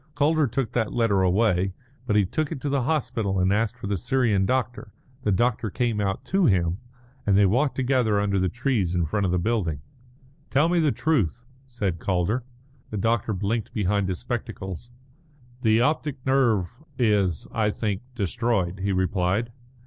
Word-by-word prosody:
Calder 150 +1 +3
took 120 0 -2
that 115 -3 0
letter 115 -5 +2
away. 95 0 +2 0.3
But 105 - +1
he 105 -2 +4
took 150 +10 -2
it - - -4
to 145 - -2
the 140 -1 +1
hospital 120 -8 -1
and 95 +2 +3
asked 115 +3 0
for 115 - -8
the 100 0 -1
Syrian 115 -4 +1
doctor. 120 -3 -2 0.3
The 105 - 0
doctor 115 +2 +1
came 115 -1 -1
out 95 -1 -2
to 190 -2 +2
him, 90 -3 +1 0.4
and 100 -1 +3
they 100 - +6
walked 125 +9 +2
together 125 -5 +2
under 100 -1 +1
the 95 0 +1
trees 120 -8 0
in 85 -2 +1
front 100 +5 0
of - - -1
the 90 - +2
building. 90 -7 -1 0.7
"Tell 145 +5 +3
me 175 0 +2
the 155 -3 +3
truth," 125 - 0 0.2
said 100 -9 -3
Calder. 95 +6 0 0.5
The 105 - -4
doctor 115 +1 +1
blinked 105 +4 -2
behind 100 -2 +1
his 90 - -2
spectacles. 110 -2 -5 0.7
"The 110 -1 +3
optic 145 -1 -1
nerve 120 -7 +2 0.2
is, 100 - +1
I 110 -2 +1
think, 105 -2 -2
destroyed," 100 -4 -1
he 100 +1 -1
replied. 95 +4 0
110 Hz, 170 wpm, -25 LUFS, 95-125 Hz, 0.7 s, they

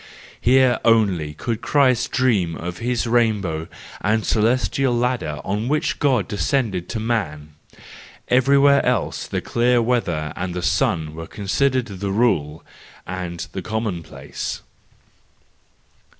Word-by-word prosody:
Here 130 0 +4
only 95 -10 +2
could 115 -1 -3
Christ 130 -5 +2
dream 105 -11 +1
of 90 +2 -6
his 120 0 -1
rainbow 105 -9 +1 0.4
and 110 +2 +1
celestial 125 +3 +1
ladder 120 -11 -1
on 105 +4 -2
which 150 +3 0
God 130 -9 +2
descended 105 -4 -1
to 115 - -3
man; 90 -10 -2 0.7
everywhere 140 +2 +4
else 125 -1 -1
the - - -2
clear 120 +1 +2
weather 90 -11 0
and 90 -1 -4
the 90 - -3
sun 85 - 0
were 80 +1 -7
considered 130 +5 0
the 100 -3 -5
rule 90 -9 0 0.4
and 90 -2 -5
the 95 - -5
commonplace. 105 -5 -5
110 Hz, 120 wpm, -21 LUFS, 90-125 Hz, 0.7 s, Here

